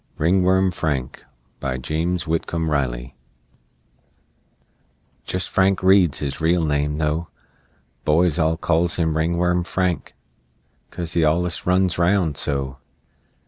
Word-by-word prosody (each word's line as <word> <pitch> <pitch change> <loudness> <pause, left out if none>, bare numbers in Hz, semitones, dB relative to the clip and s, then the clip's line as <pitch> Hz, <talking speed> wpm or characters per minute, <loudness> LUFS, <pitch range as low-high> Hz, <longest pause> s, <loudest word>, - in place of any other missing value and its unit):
"RINGWORM 95 +3 +3
FRANK" 75 -7 -3 0.4
BY 65 -2 -3
JAMES 80 +6 -2
WHITCOMB 80 0 -2
RILEY 65 -3 -2 2.1
Jest 90 0 -2
Frank 95 0 +1
Reed's 95 -5 +4
his 70 0 -4
real 85 +1 +2
name 75 0 0
though 80 +2 -1 0.8
Boys 85 +2 +2
all 80 0 +2
calls 85 +1 +1
him 80 -2 0
"Ringworm 85 +2 +1
Frank," 90 -1 -2 0.7
'Cause 85 -1 -6
he 85 - +2
allus 85 +3 0
runs 90 -1 +2
round 85 -3 +2
so. 70 -1 -2
85 Hz, 110 wpm, -22 LUFS, 75-90 Hz, 2.1 s, Reed's